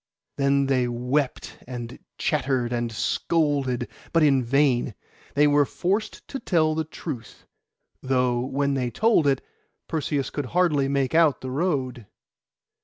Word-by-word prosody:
Then 140 0 +3
they 130 -2 +2
wept, 125 +4 -2
and 120 -2 -7 0.2
chattered, 125 -2 0
and 120 -1 -1
scolded; 140 -1 0 0.2
but 165 -1 +3
in 135 -3 +4
vain. 125 -3 +2 0.4
They 145 +1 +5
were 145 0 +5
forced 195 - -2
to 270 - -4
tell 160 -7 +2
the 160 0 -1
truth, 150 -6 -8 0.6
though, 125 -2 +1
when 140 +3 0
they 130 -3 -1
told 215 - +3
it, 135 -2 +1 0.4
Perseus 145 -4 -2
could 145 -3 -3
hardly 150 -7 +3
make 140 0 0
out 160 -5 +4
the 130 - -5
road. 130 - -1
140 Hz, 135 wpm, -25 LUFS, 125-150 Hz, 0.6 s, They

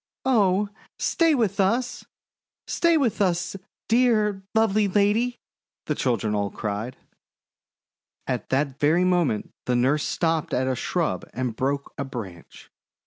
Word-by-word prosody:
"Oh, 205 -5 +3 0.3
stay 330 -3 +2
with 225 -8 0
us! 245 +6 0 0.6
Stay 335 -1 +2
with 245 -9 0
us, 180 -1 0 0.3
dear, 220 -4 +3
lovely 215 -2 +3
lady!' 210 +5 +2 0.5
the 150 - 0
children 115 -6 0
all 100 -1 0
cried. 105 +5 -4 1.3
At - - -3
that 135 0 0
very 160 +5 +3
moment 175 - +1
the 125 - +2
nurse 135 +5 +2
stopped 165 -2 0
at 130 +1 0
a 130 - 0
shrub - - -1
and 125 -3 -2
broke 140 +3 -2
a - - 0
branch. 105 -11 -9
175 Hz, 130 wpm, -25 LUFS, 130-215 Hz, 1.3 s, Oh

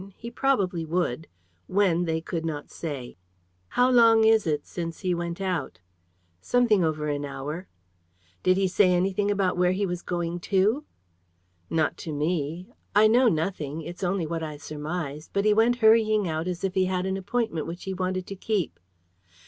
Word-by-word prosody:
He 235 0 -8
probably 200 -10 +1
would. 160 -3 -1 0.4
When, 180 -3 +2
they 160 -1 -1
could 165 0 -4
not 150 -3 -4
say. 140 - -6 0.5
"How 250 - +2
long 230 -2 +6
ago 220 - +6
is 220 -4 +3
it 150 -2 -1
since 165 -2 -6
he 185 -2 0
went 170 0 -3
out?" 180 -7 -2 0.6
"Something 230 - +3
over 155 -1 -1
an 145 -1 -2
hour." 145 +6 -5 0.7
"Did 185 0 +3
he 195 -1 +2
say 185 0 +4
anything 190 +3 +1
about 195 -3 +1
where 180 0 +3
he 200 +2 0
was 180 -1 -3
going 175 -1 -3
to?" 205 - +1 0.8
"Not 160 -1 0
to 160 - -6
me. 155 +2 -2 0.3
I 210 +1 +7
know 245 +3 +5
nothing, 160 -3 -2
it's 175 +4 -8
only 180 -1 0
what 165 +1 -3
I 155 -2 -5
surmise, 150 0 -5
but 200 +1 0
he 210 - +5
went 225 +3 +4
hurrying 215 -2 +5
out 160 +1 -2
as 180 -1 -4
if 190 -1 0
he 190 -1 +2
had 185 0 -1
an 190 0 -1
appointment 195 -3 -2
which 170 +2 -7
he 190 - -3
wanted 185 0 -2
to 195 - -7
keep." 195 - -2
180 Hz, 180 wpm, -26 LUFS, 160-200 Hz, 0.8 s, I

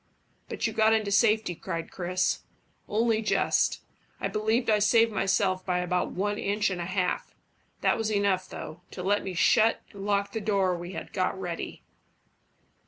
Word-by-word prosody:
"But - - -3
you 220 - -1
got 220 0 +4
into 215 -2 +1
safety," 215 -2 +3
cried 165 -1 -5
Chris. 185 +1 0 0.5
"Only 220 +1 +2
just. 215 - +1 0.4
I - - -1
believe 220 +3 0
I 215 -1 +4
saved 225 +2 +4
myself 190 -2 +1
by 180 -1 0
about 180 0 0
one 205 +2 -2
inch 205 0 0
and 180 -2 -3
a - - -3
half. 185 -1 -2 0.5
That - - +2
was 220 -1 -1
enough, 200 -3 +1
though, 155 +3 -8
to 180 - -7
let 205 +2 +1
me 190 -2 -5
shut 220 +6 +3
and 200 -1 -8
lock 200 0 0
the 220 - -3
door 195 -3 +1
we 175 +2 -7
had - - -7
got 185 0 -1
ready." 175 -3 -5
200 Hz, 170 wpm, -28 LUFS, 185-215 Hz, 0.5 s, got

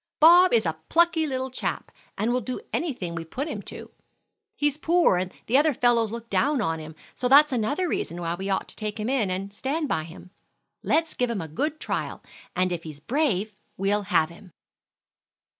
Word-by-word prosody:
"Bob 350 +4 +8
is 225 -4 +3
a 160 -1 -2
plucky 335 -1 +3
little 260 -1 -3
chap, - - -3 0.3
and 225 +4 +1
will 250 - +1
do 250 +3 -4
anything 245 - -2
we 170 -1 -4
put 260 - -4
him - - -4
to. - - -8 0.6
He's 295 -3 0
poor 335 - +3
and 180 0 -2
the 250 - +3
other 300 -2 +3
fellows 235 -3 +2
look 230 0 -6
down 285 +3 +1
on 165 -7 -1
him, 155 0 -9 0.2
so 250 - -1
that's 290 +3 +7
another 270 +9 0
reason 175 - -3
why 170 -1 -2
we 190 +3 -4
ought 190 - 0
to - - -9
take 215 0 -5
him 215 +3 -2
in 255 -7 +1
and 195 +2 -4
stand 290 +8 -2
by 160 - -1
him. 170 +2 -13 0.5
Let's 325 0 +1
give 250 -1 0
him 230 -4 -2
a 160 - -6
good 295 - -2
trial, - - -3 0.3
and 185 0 +1
if 175 -2 -2
he's 155 -3 -9
brave, 220 - 0 0.2
we'll 200 +2 +1
have 160 -4 +3
him." 170 +1 -15
230 Hz, 200 wpm, -25 LUFS, 180-290 Hz, 0.6 s, Bob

